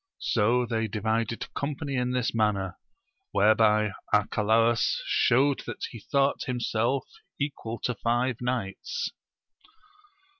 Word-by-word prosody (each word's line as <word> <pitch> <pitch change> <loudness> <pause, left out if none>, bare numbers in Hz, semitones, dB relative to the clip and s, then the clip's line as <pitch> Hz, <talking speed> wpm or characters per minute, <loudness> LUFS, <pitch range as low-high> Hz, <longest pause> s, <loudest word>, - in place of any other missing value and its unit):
So 120 +3 +2
they 115 -1 -1
divided 110 +2 -2
company 140 0 -3
in 125 -1 0
this 125 -2 0
manner, 100 -5 0 0.6
whereby 105 +1 +4 0.2
Arcalaus 110 +2 +3
showed 135 +3 +3
that - - -6
he 115 - -8
thought 140 +6 +1
himself 125 0 0 0.3
equal 125 -5 -3
to 125 - 0
five 120 +2 0
knights. 125 - -3
115 Hz, 105 wpm, -27 LUFS, 110-125 Hz, 0.6 s, whereby